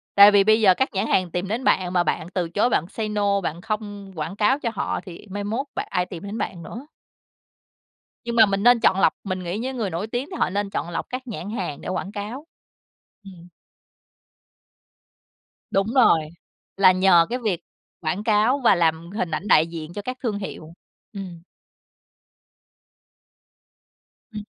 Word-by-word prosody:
Tại 200 Hz, +1 st, +9 dB
vì 200 Hz, -1 st, +5 dB
bây 220 Hz, +2 st, +4 dB
giờ 190 Hz, -3 st, +7 dB
các 265 Hz, -, 0 dB
nhãn 195 Hz, -, -1 dB
hàng 185 Hz, -3 st, +1 dB
tìm 180 Hz, +2 st, -2 dB
đến 230 Hz, +5 st, -2 dB
bạn 185 Hz, -7 st, +2 dB
mà 175 Hz, -1 st, +3 dB
bạn 160 Hz, -, -2 dB
từ 175 Hz, -3 st, -1 dB
chối, 205 Hz, +8 st, +1 dB
bạn 170 Hz, -, 0 dB
say 215 Hz, -1 st, -4 dB
no, 200 Hz, -1 st, +1 dB
bạn 170 Hz, 0 st, -4 dB
không 205 Hz, -2 st, -5 dB
quảng 160 Hz, +5 st, -4 dB
cáo 260 Hz, +7 st, +2 dB
cho 235 Hz, -, -2 dB
họ -, -, -2 dB
thì 180 Hz, +3 st, -11 dB
mai 205 Hz, 0 st, -4 dB
mốt 235 Hz, +7 st, -3 dB
bạn -, -, -3 dB
ai 180 Hz, -2 st, +1 dB
tìm 180 Hz, -1 st, -9 dB
đến 205 Hz, +3 st, -5 dB
bạn 170 Hz, -2 st, -4 dB
nữa? 260 Hz, +6 st, -9 dB, 1.4 s
Nhưng 235 Hz, 0 st, -3 dB
mà 220 Hz, -2 st, +8 dB
mình 195 Hz, 0 st, -1 dB
nên 245 Hz, 0 st, +6 dB
chọn 195 Hz, -4 st, +3 dB
lọc, -, -, +4 dB
mình 185 Hz, -1 st, -3 dB
nghĩ 175 Hz, +5 st, -3 dB
những 260 Hz, +2 st, -4 dB
người 210 Hz, -5 st, -2 dB
nổi 170 Hz, +6 st, -3 dB
tiếng 245 Hz, +6 st, -4 dB
thì 365 Hz, -, -6 dB
họ -, -, +1 dB
nên 200 Hz, +1 st, -2 dB
chọn 175 Hz, -, -3 dB
lọc 165 Hz, -, -4 dB
các 255 Hz, +1 st, -5 dB
nhãn 205 Hz, -3 st, -6 dB
hàng 180 Hz, -10 st, -4 dB
để -, -, -8 dB
quảng 190 Hz, +2 st, -3 dB
cáo. 225 Hz, +9 st, -6 dB, 0.8 s
Ừm. 180 Hz, -3 st, -13 dB, 2.2 s
Đúng 195 Hz, +1 st, +1 dB
rồi, 230 Hz, -11 st, +5 dB, 0.6 s
là 190 Hz, -1 st, +6 dB
nhờ 185 Hz, -2 st, +5 dB
cái 250 Hz, -, -1 dB
việc 210 Hz, -8 st, -1 dB, 0.4 s
quảng 180 Hz, +6 st, -2 dB
cáo 220 Hz, +5 st, +3 dB
và 215 Hz, -, +6 dB
làm 165 Hz, 0 st, 0 dB
hình 185 Hz, -5 st, -3 dB
ảnh 190 Hz, +7 st, -3 dB
đại 155 Hz, +1 st, +5 dB
diện 165 Hz, -1 st, -7 dB
cho 205 Hz, +3 st, -6 dB
các 255 Hz, +3 st, -5 dB
thương 215 Hz, -4 st, -1 dB
hiệu, 165 Hz, -5 st, -8 dB, 0.4 s
ừm. 185 Hz, -5 st, -8 dB, 2.9 s
Ừm. 210 Hz, -1 st, -6 dB
200 Hz, 185 wpm, -23 LUFS, 180-220 Hz, 2.9 s, Tại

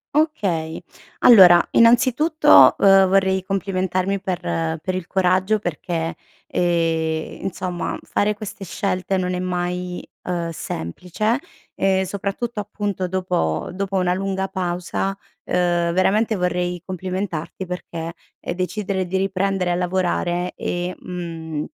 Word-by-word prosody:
Okay. 190 Hz, -, 0 dB, 0.4 s
Allora 180 Hz, -7 st, +8 dB
innanzitutto, 265 Hz, +7 st, +6 dB
uhm, 195 Hz, -1 st, +6 dB
vorrei 190 Hz, 0 st, +2 dB
complimentarmi 190 Hz, 0 st, -1 dB
per 185 Hz, -3 st, -2 dB
per 85 Hz, -, -2 dB
il 185 Hz, -2 st, -4 dB
coraggio 190 Hz, +3 st, +2 dB
perché, 165 Hz, -2 st, -3 dB, 0.3 s
ehm, 165 Hz, -2 st, -1 dB
insomma 180 Hz, -2 st, -3 dB
fare 210 Hz, +1 st, 0 dB
queste 205 Hz, -1 st, -8 dB
scelte 190 Hz, 0 st, -2 dB
non 180 Hz, 0 st, -1 dB
è 180 Hz, -, -2 dB
mai, 180 Hz, 0 st, -3 dB, 0.2 s
uhm, 170 Hz, -2 st, -2 dB
semplice, 180 Hz, -, -3 dB, 0.3 s
ehm, 190 Hz, 0 st, +1 dB
soprattutto, 200 Hz, +4 st, -3 dB
appunto, 205 Hz, -3 st, -3 dB
dopo 180 Hz, -, -1 dB
dopo 195 Hz, +1 st, -3 dB
una 180 Hz, -1 st, +2 dB
lunga 190 Hz, 0 st, -2 dB
pausa. 185 Hz, +1 st, -2 dB, 0.3 s
Uhm, 175 Hz, -1 st, +1 dB
veramente 210 Hz, +4 st, +2 dB
vorrei 180 Hz, -1 st, -1 dB
complimentarti, 185 Hz, -1 st, -4 dB
perché, 170 Hz, -2 st, -6 dB, 0.3 s
ehm, -, -, -4 dB
decidere 190 Hz, +1 st, -2 dB
di 190 Hz, -, -1 dB
riprendere 195 Hz, -1 st, 0 dB
a -, -, +1 dB
lavorare 180 Hz, 0 st, -1 dB
e 175 Hz, +1 st, -3 dB
mhmm, 165 Hz, -4 st, -5 dB
185 Hz, 115 wpm, -21 LUFS, 175-195 Hz, 0.4 s, Allora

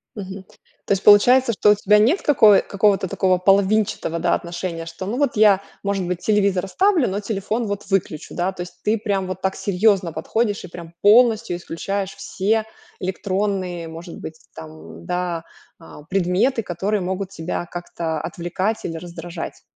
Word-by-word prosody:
Мгм. 195 Hz, -2 st, -7 dB, 0.4 s
То -, -, -5 dB
есть 195 Hz, -, -2 dB
получается, 240 Hz, +4 st, +6 dB
что 210 Hz, 0 st, +4 dB
у -, -, +5 dB
тебя 210 Hz, +1 st, +4 dB
нет 255 Hz, -, +3 dB
какой 220 Hz, -8 st, +6 dB
какого-то 200 Hz, -1 st, +1 dB
такого 185 Hz, +1 st, +1 dB
половинчатого, 195 Hz, -2 st, +2 dB
да, -, -, +1 dB
отношения, 170 Hz, -1 st, -4 dB
что, 165 Hz, +3 st, -7 dB
ну 215 Hz, +6 st, -3 dB
вот, 280 Hz, -2 st, +1 dB
я, 205 Hz, -2 st, +5 dB, 0.2 s
может 200 Hz, -2 st, -1 dB
быть, 180 Hz, -1 st, -2 dB
телевизор 200 Hz, -3 st, +1 dB
оставлю, 365 Hz, -, +2 dB
но 195 Hz, +1 st, -2 dB
телефон 215 Hz, +2 st, -2 dB
вот 205 Hz, 0 st, -4 dB
выключу, 175 Hz, -5 st, -1 dB
да. 180 Hz, +2 st, 0 dB
То 180 Hz, -, -8 dB
есть 175 Hz, 0 st, -14 dB
ты 215 Hz, +2 st, +2 dB
прям 200 Hz, -3 st, -2 dB
вот 185 Hz, 0 st, -5 dB
так 190 Hz, 0 st, -1 dB
серьезно 195 Hz, -2 st, +1 dB
подходишь 205 Hz, +7 st, -1 dB
и -, -, -8 dB
прям 170 Hz, -1 st, -10 dB
полностью 225 Hz, -2 st, +4 dB
исключаешь 190 Hz, +3 st, -4 dB
все 215 Hz, +3 st, -1 dB, 0.3 s
электронные, 185 Hz, -2 st, -2 dB
может 165 Hz, +2 st, -9 dB
быть, 160 Hz, 0 st, -8 dB, 0.2 s
там, 80 Hz, -1 st, -9 dB, 0.3 s
м, 85 Hz, -, -14 dB
да, 180 Hz, -2 st, -2 dB, 0.4 s
а, 165 Hz, -2 st, -13 dB
предметы, 195 Hz, -, +1 dB
которые 195 Hz, +3 st, -2 dB
могут 185 Hz, +1 st, -3 dB
тебя 175 Hz, -1 st, -5 dB
как-то 170 Hz, -2 st, -4 dB
отвлекать 185 Hz, +6 st, -3 dB
или 165 Hz, -, -4 dB
раздражать. 170 Hz, 0 st, -7 dB
190 Hz, 165 wpm, -21 LUFS, 175-210 Hz, 0.4 s, получается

